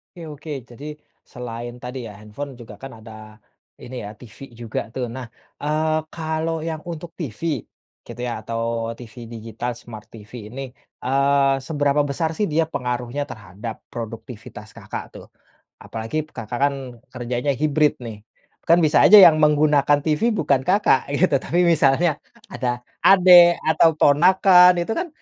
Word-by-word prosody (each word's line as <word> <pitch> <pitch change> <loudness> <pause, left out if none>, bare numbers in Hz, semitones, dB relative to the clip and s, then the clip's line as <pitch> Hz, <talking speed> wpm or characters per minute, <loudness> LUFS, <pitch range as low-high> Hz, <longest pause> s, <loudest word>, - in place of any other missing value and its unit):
Oke 175 - -11
oke. 150 +2 -10 0.2
Jadi 135 +5 -11 0.5
selain 120 -1 -7
tadi 125 +2 -6
ya 105 - -9
handphone 120 +6 -8
juga 110 -3 -11
kan 135 - -7
ada, 110 - -11 0.7
ini 130 - -9
ya 100 - -7
TV 120 -4 -14 0.2
juga 115 -1 -4
tuh. 130 -2 -3
Nah, 130 -1 -6 0.4
eee, 155 +1 0 0.2
kalau 160 0 -2
yang 160 -1 -4
untuk 165 +1 -8
TV 140 -8 -6 0.7
gitu - - -10
ya 120 - -3
atau 115 +1 -5 0.4
TV 120 -1 -12 0.2
digital 115 +2 -5
smart 110 -3 -11
TV 105 -2 -14 0.2
ini, 130 +5 -8 0.4
eee, 140 +1 +2
seberapa 145 -2 +1
besar 160 +4 -1
sih 210 - 0
dia 165 +2 +3
pengaruhnya 125 +2 -3
terhadap 105 +2 -8 0.2
produktivitas 115 -2 -9
Kakak - - -7 0.2
tuh? - - -13 0.6
Apalagi 115 +8 -4
Kakak 115 +2 -5
kan 140 0 +2 0.4
kerjanya 125 +2 -2
hybrid 150 0 +2
nih. 110 -2 -7 0.5
Kan 170 - +7
bisa 150 - +2
aja 210 - +9
yang 160 -3 +7
menggunakan 150 -1 +3
TV 150 -1 0
bukan 145 -9 +1
Kakak 180 -5 +2
gitu 165 +6 +2
tapi 175 - -1
misalnya 155 0 +3 0.4
ada 125 0 -2 0.4
adik 180 -2 +7
atau 165 +1 +5
ponakan 180 +4 +6
itu 170 - -3
kan 360 - -3
140 Hz, 150 wpm, -21 LUFS, 120-160 Hz, 0.7 s, aja